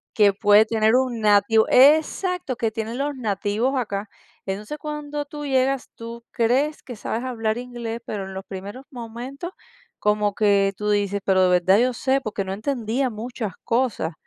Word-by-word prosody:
que 205 -2 +5
puede 205 +2 +5
tener 220 0 +2
un 250 -3 +1
nativo 210 +1 +4
¡Exacto! 310 +2 +4
Que 225 -2 -1
tienen 225 +2 -4
los 285 0 -2
nativos 215 +2 -1
acá. 205 -3 -3 0.4
Entonces, 210 +9 -4
cuando 295 -1 -5
tú 295 0 -7
llegas, 265 -1 +1
tú 230 0 -8
crees 265 +7 +1
que 245 - -8
sabes 225 +3 -3
hablar 225 -3 -1
inglés, 240 -2 -5
pero 200 -3 -4
en 190 - -8
los 190 +1 -7
primeros 200 +7 -8
momentos 250 +6 -7 0.5
como 210 0 +1
que 200 -1 +3
tú 210 0 -2
dices: 205 -1 +1
"¿Pero 190 -1 +3
de 185 - +4
verdad 190 +3 +4
yo 250 +1 +2
sé?". 265 +3 +1
Porque 215 -5 -3
no 190 - -3
entendía 240 +3 -1
muchas 220 -1 -5
cosas. 230 -9 0
230 Hz, 170 wpm, -23 LUFS, 205-260 Hz, 0.5 s, que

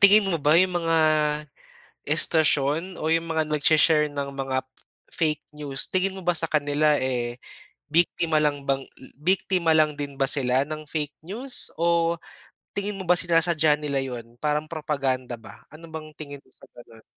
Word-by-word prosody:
Tingin 200 +1 +7
mo 165 - 0
ba 150 +2 +3
yung 180 -1 +2
mga 165 -1 +1 1.1
istasyon 160 +3 +2
o 155 - -2
yung 165 0 -1
mga 160 -1 0
nagshi-share 150 0 +3
ng 140 -1 -5
mga 135 -1 -2 0.5
fake 155 -3 -1
news 145 -2 -3
tingin 190 +1 0
mo 190 - -8
ba 175 - +3
sa 165 0 -1
kanila, 150 0 +2
eh, 120 -2 -2 0.5
biktima 165 -1 +2
lang 145 -2 0
bang, 135 0 +1
hmm 130 - -18
biktima 180 -1 +1
lang 155 -1 +3
din 140 -1 -5
ba - - +4
sila 130 -1 +3
ng 155 0 -6
fake 150 -2 -3
news 245 +7 0
o 170 0 +2 0.6
tingin 200 0 -3
mo 190 - -5
ba 180 - +5
sinasadya 165 -3 +3
nila 140 -2 -2
yun 120 -2 -8
parang 150 0 -1
propaganda 135 -6 -2
ba? 110 -2 -14
Ano 165 +2 -12
bang 155 -1 -8
tingin 145 -3 -9
mo 130 - -27
sa - - -17
ganon? 115 -2 -15
155 Hz, 170 wpm, -24 LUFS, 140-165 Hz, 1.1 s, Tingin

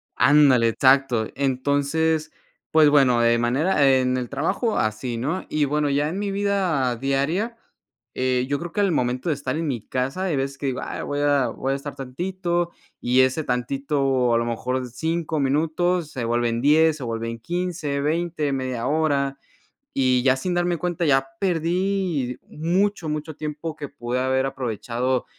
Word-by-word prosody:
Ándale, 140 -5 +5
exacto, 130 -2 +3
entonces, 145 +4 0 0.4
pues 155 -2 +6
bueno, 135 -5 +4
de 115 0 +4
manera 140 +6 +2
en 130 0 +1
el 125 -1 -4
trabajo 190 - -1
así, 110 +3 -1
¿no?, 145 +10 -2
y 150 -1 +1
bueno, 150 +1 0
ya 145 +2 +1
en 185 +5 -4
mi 205 -1 -2
vida 190 -11 0
diaria, 140 - -1 0.6
eh, 130 -1 +1
yo 145 0 0
creo 175 0 -6
que 205 - +1
al 200 -2 +2
momento 125 +1 -1
de 155 - +1
estar 145 +2 -3
en 165 0 -2
mi 120 -7 -4
casa 135 +8 -2
hay 175 -5 0
veces 135 0 -2
que 140 - -6
digo, 130 - -2
ay - - -5
voy 145 - -3
a 145 -3 +3
voy 135 +4 -2
a - - 0
estar 140 +1 -6
tantito 175 +5 -2 0.3
y 125 +2 +3
ese 130 +4 +1
tantito 135 0 0
a - - +4
lo 115 - 0
mejor 125 +2 -2
5 160 +4 -2
minutos 160 +4 +1
se 125 -4 -4
vuelven 120 0 0
10 155 +3 +4
se 140 - -7
vuelven 115 0 -3
15 170 -1 -2
20, 155 0 -1
media 130 -3 -2
hora 140 -3 +1 0.6
y 130 -2 +2
ya 130 -1 +4
sin 180 +7 -2
darme 175 0 +1
cuenta 175 +1 -2
ya 135 -2 +2
perdí 175 -6 0
mucho, 175 +2 0
mucho 150 0 -4
tiempo 155 +1 -5
que 145 -2 -7
pude 125 -2 -3
haber 130 +1 +1
aprovechado, 125 0 -2
140 Hz, 170 wpm, -23 LUFS, 130-160 Hz, 0.6 s, pues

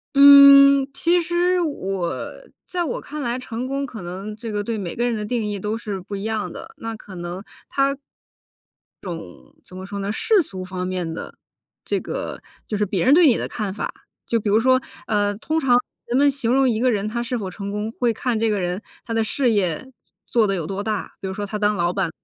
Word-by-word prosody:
嗯， 280 -1 +9
其 345 +3 +3
实 350 +1 +1
我 195 - -2 0.5
在 355 -1 -1
我 285 - -3
看 300 0 -7
来， 245 0 -2
成 240 0 -5
功 275 +1 -2
可 225 -6 -8
能 190 +5 -6
这 225 0 -6
个 205 0 -1
对 225 +1 -3
每 180 -4 -4
个 240 - -1
人 240 -2 0
的 210 -1 -3
定 220 -2 -1
义 205 - -2
都 210 +3 -3
是 205 -5 -5
不 200 +2 -6
一 195 - -6
样 220 -1 -2
的， - - -10
那 225 0 -4
可 195 -3 -12
能 175 +2 -5 0.3
它 275 0 +1 1.1
这 190 - -6
种 165 - -5 0.4
怎 185 - -12
么 190 - -7
说 200 0 -6
呢， 200 +1 -2
世 410 - +3
俗 190 - -6
方 185 0 -4
面 180 -3 -3
的 - - -7 0.5
这 - - 0
个 - - -5 0.3
就 215 - -2
是 210 - +1
别 190 0 -1
人 270 - +6
对 335 -1 +7
你 240 - +5
的 - - -2
看 210 -4 -3
法， - - -4 0.3
就 230 - +1
比 205 - -2
如 215 +2 +4
说， 255 +2 +4 0.3
呃， 205 -1 +1
通 315 +7 -1
常 250 -4 +4 0.3
人 245 - +1
们 285 +1 +5
形 245 -4 0
容 270 0 +4
一 220 -1 0
个 255 0 +3
人 205 -1 -1
他 235 +2 -2
是 240 +1 -2
否 195 -4 -4
成 200 +2 -6
功， 210 +2 -3
会 240 0 0
看 230 -1 -1
这 225 -1 +2
个 205 -2 0
人 180 +3 -2 0.2
他 230 - -4
的 225 -1 +2
事 245 +2 +1
业 200 +5 0 0.3
做 225 -3 +2
得 195 - 0
有 165 -4 -3
多 195 +3 -4
大， 215 -2 -3
比 190 - -4
如 190 - -4
说 205 - -3
他 210 +1 -4
当 210 0 +2
老 175 0 0
板 190 -4 0
220 Hz, 250 characters per minute, -22 LUFS, 195-260 Hz, 1.1 s, 嗯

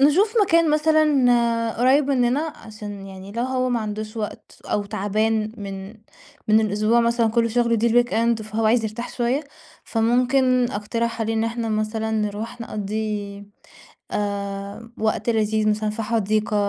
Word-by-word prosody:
نشوف 360 +10 +4
مكان 335 -4 +3
مثلًا 255 -7 +3
قريّب 265 +4 +4
مننا 255 +1 +2 0.2
عشان 205 -2 -9
يعني 190 0 -10
لو 235 +2 -2
هو 255 0 0
ما 240 -2 +1
عندوش 215 +1 -5
وقت 215 -2 -6
أو 205 - -1
تعبان 215 +2 0
من 195 -2 -6 0.6
من 215 +1 +6
الأسبوع 215 +3 +2
مثلًا 235 0 +2
كلّه 230 0 +2
شغل، 235 0 +2
دي 230 +2 +2 0.2
الweekend 230 -1 0
فهو 215 +1 -1
عايز 225 +1 +3
يرتاح 220 +3 -5
شوية، 255 +5 0 0.4
فممكن 250 +2 +2
أقترح 230 +3 -2
عليه 225 0 0
إن 225 0 +1
إحنا 230 0 -2
مثلًا 215 +1 -1
نروح 215 +2 -3
نقضّي 210 -2 -4 0.7
آآ، 200 +2 -4
وقت 220 +1 0
لذيذ 215 -1 +1
مثلًا 215 0 0
في 215 +2 -4
حديقة 215 -1 0
225 Hz, 145 wpm, -23 LUFS, 210-240 Hz, 0.7 s, من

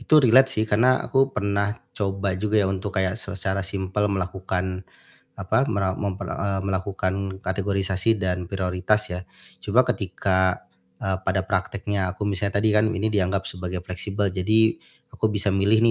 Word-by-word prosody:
Itu 155 - +4
relate 130 +3 +7
sih, 110 -5 +1
karena 115 +4 +4
aku 135 0 +3
pernah 100 -3 -1 0.2
coba 100 -1 -1
juga 105 +1 +1
ya, 105 - +4
untuk 95 +1 -2
kayak 95 +4 0
se - - -5
secara 95 +1 -1
simple 95 +2 -1
melakukan, 95 -1 -2 0.6
apa, 100 +6 +2
mera 95 -2 0
memper 100 -2 -3
eee, 95 +3 -2
melakukan 95 0 -2
kategorisasi 95 +2 0
dan 90 -1 -1
prioritas 95 +3 0
ya. 90 +1 -5 0.4
Cuma 125 +5 +3
ketika, 95 -3 0 0.3
eee, 95 -1 -1
pada 95 0 +1
prakteknya 100 0 -1
aku 100 +3 -3
misalnya 100 0 0
tadi 105 0 +3
kan 110 +1 +3
ini 110 0 0
dianggap 100 -2 0
sebagai 90 0 -4
fleksibel, 95 +3 -2
jadi 110 +4 +3 0.4
aku 115 -2 0
bisa 105 -1 0
milih 100 +3 +3
100 Hz, 155 wpm, -24 LUFS, 95-105 Hz, 0.6 s, relate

